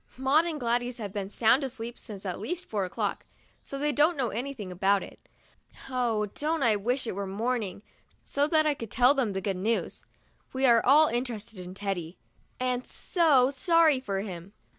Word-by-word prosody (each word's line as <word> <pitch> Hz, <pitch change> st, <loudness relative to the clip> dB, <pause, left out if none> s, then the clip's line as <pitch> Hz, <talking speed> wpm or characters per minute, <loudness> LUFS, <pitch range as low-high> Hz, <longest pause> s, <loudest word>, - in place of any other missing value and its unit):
Maud 275 Hz, +5 st, +3 dB
and 315 Hz, -3 st, -3 dB
Gladys 245 Hz, 0 st, -1 dB
have 205 Hz, -4 st, -6 dB
been 195 Hz, -2 st, -4 dB
sound 235 Hz, +6 st, +3 dB
asleep 240 Hz, -3 st, -5 dB
since 205 Hz, -3 st, -8 dB
at 185 Hz, -1 st, -3 dB
least 355 Hz, -, -4 dB
four 205 Hz, -, -2 dB
o'clock, 180 Hz, -, -3 dB, 0.4 s
so 275 Hz, -, -6 dB
they 295 Hz, +2 st, 0 dB
don't 300 Hz, +4 st, +3 dB
know 255 Hz, -4 st, 0 dB
anything 235 Hz, -4 st, -5 dB
about 195 Hz, +2 st, +2 dB
it. -, -, -14 dB, 0.6 s
Oh, 235 Hz, -4 st, 0 dB
don't 300 Hz, +8 st, -2 dB
I 225 Hz, -3 st, +4 dB
wish 245 Hz, +6 st, -1 dB
it -, -, -2 dB
were 200 Hz, +1 st, -4 dB
morning, 215 Hz, 0 st, -2 dB, 0.4 s
so 285 Hz, +1 st, 0 dB
that 310 Hz, 0 st, +3 dB
I 300 Hz, -, +3 dB
could 230 Hz, -6 st, -8 dB
tell 250 Hz, +5 st, +5 dB
them 250 Hz, -8 st, 0 dB
the 190 Hz, -, -3 dB
good 195 Hz, -1 st, -2 dB
news! 220 Hz, +5 st, -2 dB, 0.5 s
We 265 Hz, +1 st, +1 dB
are 235 Hz, -3 st, +5 dB
all 295 Hz, +4 st, +6 dB
interested 235 Hz, -4 st, -3 dB
in 180 Hz, +1 st, -8 dB
Teddy, 195 Hz, -4 st, -4 dB, 0.4 s
and 255 Hz, 0 st, -1 dB
so 285 Hz, -7 st, +3 dB
sorry 320 Hz, 0 st, +3 dB
for 200 Hz, -6 st, -3 dB
him. 190 Hz, -1 st, -8 dB
240 Hz, 185 wpm, -28 LUFS, 200-275 Hz, 0.6 s, all